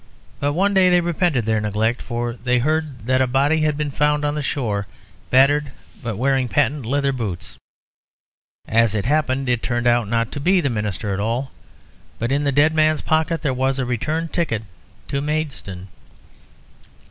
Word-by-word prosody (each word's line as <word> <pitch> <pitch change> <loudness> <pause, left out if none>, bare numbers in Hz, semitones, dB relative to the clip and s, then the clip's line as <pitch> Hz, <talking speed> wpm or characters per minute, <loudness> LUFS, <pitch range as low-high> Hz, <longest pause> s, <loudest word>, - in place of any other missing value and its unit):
But 145 0 0
one 195 +5 +2
day 190 -1 +5
they 180 0 +5
repented 170 - 0
their 110 -1 +1
neglect, 110 +3 0
for 120 -1 -3
they 125 +1 0
heard 150 -2 -1
that 130 +1 +2
a 130 - +2
body 140 +5 +2
had 150 -1 +1
been 150 -1 -2
found 150 +1 +1
on 145 - 0
the 150 - -2
shore, 110 -8 -2 0.4
battered, 140 +2 +4 0.3
but 110 -4 -4
wearing 135 +1 +1
patent 140 -1 0
leather 140 +2 +1
boots. 100 -9 -5 1.1
As 115 -1 +3
it 105 - -1
happened, 135 -1 +1
it 120 -2 +1
turned 120 -1 -2
out 120 -2 +3
not 115 +1 0
to - - -5
be 185 +6 +3
the 140 -6 0
minister 105 -1 -2
at 95 - -3
all. 120 +6 -2 0.7
But 120 +2 -2
in 145 +1 +1
the 140 - +2
dead 145 +3 +3
man's 155 0 +2
pocket 160 +1 0
there 135 -4 +1
was 130 +1 0
a 130 - -1
return 155 +7 -2
ticket 155 - -2 0.5
to 140 - -1
Maidstone." 140 - -4
135 Hz, 180 wpm, -21 LUFS, 115-150 Hz, 1.1 s, day